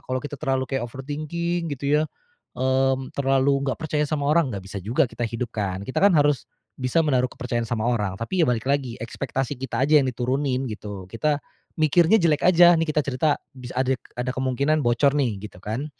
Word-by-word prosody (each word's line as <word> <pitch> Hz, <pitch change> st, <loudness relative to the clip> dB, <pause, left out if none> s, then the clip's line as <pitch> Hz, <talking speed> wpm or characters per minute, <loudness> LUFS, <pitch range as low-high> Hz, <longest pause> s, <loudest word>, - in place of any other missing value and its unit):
Kalau 130 Hz, 0 st, -1 dB
kita 145 Hz, -, -5 dB
terlalu 135 Hz, -3 st, 0 dB
kayak 135 Hz, -1 st, -2 dB
overthinking 155 Hz, +6 st, -3 dB
gitu 140 Hz, -1 st, -5 dB, 0.2 s
ya, -, -, +2 dB, 0.5 s
mmm, 130 Hz, 0 st, +1 dB
terlalu 135 Hz, 0 st, +2 dB
nggak -, -, -2 dB
percaya 155 Hz, -2 st, -1 dB
sama 145 Hz, -2 st, -1 dB
orang, 160 Hz, -3 st, +3 dB
nggak 100 Hz, -4 st, -6 dB
bisa 100 Hz, +1 st, -6 dB
juga 115 Hz, +7 st, +2 dB
kita 120 Hz, -, -7 dB
hidup 115 Hz, +1 st, -4 dB
kan. 100 Hz, -2 st, -2 dB
Kita 130 Hz, -, -2 dB
kan 200 Hz, +1 st, +6 dB
harus 145 Hz, -2 st, +2 dB, 0.3 s
bisa 140 Hz, +6 st, +2 dB
menaruh 130 Hz, -4 st, +2 dB
kepercayaan 120 Hz, -3 st, -3 dB
sama 115 Hz, -2 st, -1 dB
orang. 105 Hz, -6 st, 0 dB
Tapi 145 Hz, -, -2 dB
ya 155 Hz, -, +3 dB
balik 115 Hz, -2 st, 0 dB
lagi 135 Hz, -3 st, -1 dB
ekspektasi 135 Hz, +3 st, -3 dB
kita 130 Hz, 0 st, -1 dB
aja 150 Hz, +1 st, +5 dB
yang 135 Hz, -, 0 dB
diturunin 130 Hz, +2 st, -1 dB
gitu. 105 Hz, -3 st, -7 dB
Kita 150 Hz, +6 st, +1 dB, 0.4 s
mikirnya 165 Hz, +5 st, +4 dB
jelek 160 Hz, -5 st, +2 dB
aja. 175 Hz, -1 st, +7 dB
Nih 165 Hz, -1 st, 0 dB
kita 150 Hz, -1 st, +1 dB
cerita, 140 Hz, +3 st, +1 dB, 0.2 s
bis 125 Hz, -2 st, -10 dB
adik 130 Hz, -1 st, +1 dB, 0.2 s
ada 125 Hz, +1 st, -2 dB
kemungkinan 130 Hz, +4 st, 0 dB
bocor 120 Hz, +4 st, +3 dB
nih 130 Hz, -8 st, 0 dB
gitu 95 Hz, -4 st, -10 dB
kan, 115 Hz, +8 st, -3 dB
135 Hz, 195 wpm, -24 LUFS, 120-150 Hz, 0.5 s, aja